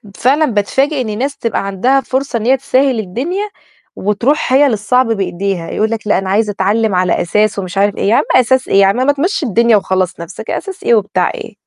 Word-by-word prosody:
فعلًا 285 Hz, +5 st, +2 dB
باتفاجئ 265 Hz, +5 st, 0 dB
إن 215 Hz, -3 st, -4 dB
ناس 275 Hz, +3 st, -3 dB
تبقى 230 Hz, -3 st, -2 dB
عندها 250 Hz, +8 st, +1 dB
فرصة 265 Hz, -2 st, -2 dB
إن 220 Hz, -, -4 dB
هي 265 Hz, +2 st, +3 dB
تسهّل 265 Hz, -1 st, +1 dB
الدنيا 290 Hz, -, -3 dB, 0.5 s
وتروح 235 Hz, +8 st, 0 dB
هي 285 Hz, +2 st, +5 dB
للصعب 250 Hz, +2 st, +1 dB
بإيديها، 195 Hz, -4 st, -2 dB
يقول 220 Hz, +1 st, -1 dB
لك: 220 Hz, -2 st, -4 dB
"لأ -, -, +3 dB
أنا 190 Hz, 0 st, -3 dB
عايز 210 Hz, +2 st, +1 dB
أتعلم 205 Hz, +1 st, 0 dB
على 180 Hz, 0 st, +1 dB
أساس" 210 Hz, +3 st, 0 dB
ومش 185 Hz, 0 st, -6 dB
عارف 200 Hz, +1 st, +2 dB
إيه، 200 Hz, -, 0 dB
يا 230 Hz, -, +4 dB
عم -, -, +3 dB
أساس 255 Hz, +1 st, +3 dB
إيه؟ -, -, 0 dB
يا -, -, +6 dB
عم 195 Hz, -, +2 dB
ما 260 Hz, +3 st, +2 dB
تمشي 320 Hz, +3 st, -1 dB
الدنيا 235 Hz, -1 st, +3 dB
وخلّص 185 Hz, -2 st, -1 dB
نَفسك، 170 Hz, +6 st, -9 dB
أساس 390 Hz, -1 st, -5 dB
إيه 235 Hz, -, +4 dB
وبتاع 195 Hz, -4 st, 0 dB
إيه؟ 225 Hz, -, -9 dB
225 Hz, 210 wpm, -14 LUFS, 200-265 Hz, 0.5 s, يا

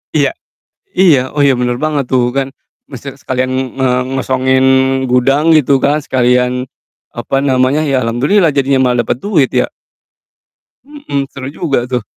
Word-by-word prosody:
Iya. -, -, +2 dB, 0.6 s
Iya, 150 Hz, -9 st, +4 dB
oh 145 Hz, -, +2 dB
iya 140 Hz, -2 st, +4 dB
bener 125 Hz, 0 st, 0 dB
banget 145 Hz, -1 st, -2 dB
tuh 125 Hz, -1 st, +1 dB
kan 135 Hz, 0 st, -1 dB, 0.4 s
maksudnya 135 Hz, +1 st, -9 dB
sekalian 130 Hz, 0 st, -2 dB, 0.6 s
mengosongin 130 Hz, 0 st, 0 dB, 0.5 s
gudang 135 Hz, +6 st, +2 dB
gitu 145 Hz, -3 st, +4 dB
kan, 145 Hz, +2 st, +2 dB
sekalian 125 Hz, -1 st, 0 dB, 0.5 s
apa 120 Hz, +3 st, -3 dB
namanya, 130 Hz, +2 st, +1 dB
ya 135 Hz, -3 st, 0 dB
alhamdulillah 145 Hz, -, +1 dB
jadinya 135 Hz, -1 st, +1 dB
malah 125 Hz, -1 st, +1 dB
dapet -, -, -2 dB
duit 160 Hz, -9 st, +1 dB
ya. 125 Hz, -1 st, +1 dB, 1.2 s
Mhm, 285 Hz, -, -4 dB
seru 135 Hz, -1 st, -7 dB
juga 150 Hz, -2 st, -1 dB
tuh. 125 Hz, -1 st, -2 dB
135 Hz, 140 wpm, -13 LUFS, 125-145 Hz, 1.2 s, Iya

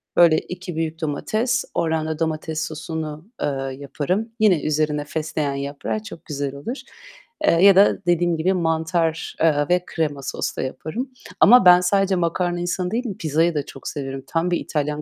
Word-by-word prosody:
Böyle 170 Hz, -2 st, +6 dB
2 180 Hz, -1 st, -6 dB
büyük 160 Hz, 0 st, -3 dB
domates 220 Hz, -, -1 dB
ordan 160 Hz, -1 st, 0 dB
da 160 Hz, -1 st, -3 dB
domates 160 Hz, 0 st, -2 dB
sosunu, 155 Hz, 0 st, -6 dB, 0.2 s
eee, -, -, +1 dB, 0.3 s
yaparım. 165 Hz, -, -2 dB
Yine 190 Hz, -8 st, +4 dB
üzerine 150 Hz, -1 st, 0 dB
fesleğen 155 Hz, -2 st, -2 dB
yaprağı 140 Hz, +10 st, -4 dB
çok 170 Hz, -6 st, -10 dB
güzel 140 Hz, -2 st, -4 dB
olur. 235 Hz, -, -5 dB, 0.7 s
Eee, -, -, +5 dB
ya 195 Hz, -2 st, +8 dB
da 200 Hz, -2 st, +4 dB
dediğim 175 Hz, -1 st, +2 dB
gibi, 185 Hz, +4 st, +1 dB
mantar, 165 Hz, -1 st, 0 dB
eee, 145 Hz, -3 st, +3 dB
ve 180 Hz, 0 st, +3 dB
krema 145 Hz, -4 st, -2 dB
soslu -, -, -3 dB
yaparım 185 Hz, -, -4 dB, 0.3 s
ama 240 Hz, -3 st, +7 dB
ben 180 Hz, 0 st, +8 dB
sadece 195 Hz, +1 st, +2 dB
makarna 175 Hz, 0 st, 0 dB
insanı 180 Hz, +1 st, -2 dB
değil 245 Hz, +3 st, -1 dB
pizzayı 160 Hz, +2 st, +1 dB
da 145 Hz, -, -1 dB
çok 135 Hz, -, -10 dB
severim. 135 Hz, -2 st, -5 dB
Tam 170 Hz, +2 st, 0 dB
bir 175 Hz, -, +1 dB
İtalyan 150 Hz, 0 st, -2 dB
160 Hz, 165 wpm, -22 LUFS, 150-180 Hz, 0.7 s, ya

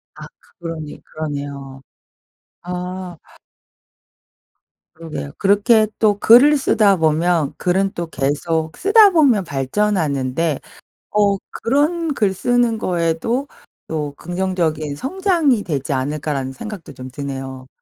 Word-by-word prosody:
아 -, -, -9 dB, 0.3 s
그러네, 165 Hz, -3 st, -6 dB
그러네요. 140 Hz, -3 st, -6 dB, 0.8 s
아. 180 Hz, 0 st, -6 dB, 1.8 s
그러게요. 160 Hz, -3 st, -7 dB
그렇게 210 Hz, +2 st, +4 dB
또 210 Hz, -2 st, +3 dB
글을 280 Hz, +6 st, +7 dB
쓰다 210 Hz, -7 st, +3 dB
보면 160 Hz, -1 st, +1 dB
글은 190 Hz, +2 st, +1 dB
또 170 Hz, -1 st, -4 dB
계속 155 Hz, +3 st, -2 dB
쓰다 415 Hz, +1 st, +6 dB
보면 270 Hz, -, +4 dB
발전하는데 145 Hz, -2 st, -1 dB, 0.5 s
어 205 Hz, -1 st, +2 dB, 0.3 s
'그런 300 Hz, +6 st, +1 dB
글 205 Hz, -7 st, +1 dB
쓰는 240 Hz, +2 st, +1 dB
거에도 180 Hz, -, -1 dB, 0.4 s
또 150 Hz, -3 st, -3 dB
긍정적인 170 Hz, -5 st, -2 dB
성장이 315 Hz, -, +1 dB
되지 145 Hz, -5 st, -3 dB
않을까?'라는 135 Hz, 0 st, -2 dB
생각도 195 Hz, +4 st, -8 dB
좀 130 Hz, 0 st, -9 dB
드네요. 135 Hz, -1 st, -6 dB
175 Hz, 230 characters per minute, -19 LUFS, 145-215 Hz, 1.8 s, 글을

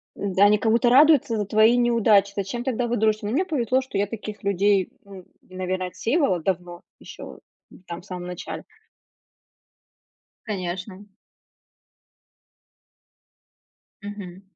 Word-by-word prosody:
Да, 195 Hz, 0 st, +1 dB
они 210 Hz, +1 st, +5 dB
как 220 Hz, +1 st, 0 dB
будто 235 Hz, +1 st, +3 dB
радуются 270 Hz, -3 st, +5 dB
за 210 Hz, -, -1 dB
твои 215 Hz, +4 st, +4 dB
неудачи, 220 Hz, -4 st, +3 dB
зачем 200 Hz, +5 st, -3 dB
тогда 245 Hz, -2 st, -1 dB
вы 240 Hz, -, -1 dB
дружите? 215 Hz, -1 st, +1 dB
Но 210 Hz, -, -2 dB
мне 345 Hz, +9 st, +1 dB
повезло, 260 Hz, -, 0 dB
что 260 Hz, -6 st, -6 dB
я 200 Hz, +1 st, +1 dB
таких 215 Hz, -1 st, -8 dB
людей, 200 Hz, -1 st, +2 dB, 0.2 s
м, 195 Hz, -2 st, -12 dB, 0.2 s
наверно, 185 Hz, 0 st, -3 dB
отсеивала 190 Hz, -, 0 dB
давно, 175 Hz, -1 st, -3 dB, 0.2 s
ещё, -, -, -11 dB, 0.3 s
м, -, -, -17 dB
там 170 Hz, +1 st, -7 dB
в 180 Hz, -, -20 dB
самом 180 Hz, -2 st, -7 dB
начале. 180 Hz, 0 st, -7 dB, 1.8 s
Конечно. 190 Hz, 0 st, -5 dB, 3.0 s
Мгм. 200 Hz, -3 st, -8 dB
205 Hz, 130 wpm, -24 LUFS, 185-235 Hz, 3.0 s, они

